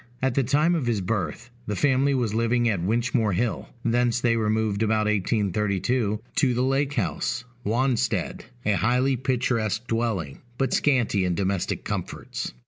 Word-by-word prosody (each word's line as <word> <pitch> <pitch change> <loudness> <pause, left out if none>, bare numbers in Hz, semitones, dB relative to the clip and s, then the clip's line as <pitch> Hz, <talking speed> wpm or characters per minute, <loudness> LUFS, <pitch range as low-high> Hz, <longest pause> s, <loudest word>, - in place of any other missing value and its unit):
At 130 0 +1
the 135 - +2
time 150 +7 +2
of 155 -8 -1
his 115 -3 +1
birth, 105 +5 -3 0.2
the 105 - -1
family 135 +4 +2
was 120 -5 0
living 115 +1 +2
at 100 -6 0
Winchmore 115 +1 +1
Hill: 115 +4 -1 0.2
thence 120 0 +2
they 120 -1 +2
removed 110 -2 0
about 110 -1 +2
1832, 105 +2 0 0.2
to 130 -3 +3
the 125 - +1
Lake 135 +2 +1
House, 105 - -1 0.2
Wanstead, 115 -3 0 0.2
a 105 - +3
highly 125 +5 +2
picturesque 120 -4 -1
dwelling, 115 - -2 0.2
but 135 0 0
scanty 125 -9 +2
in 90 -1 0
domestic 95 0 -1
comforts. - - -4
115 Hz, 150 wpm, -25 LUFS, 105-125 Hz, 0.2 s, to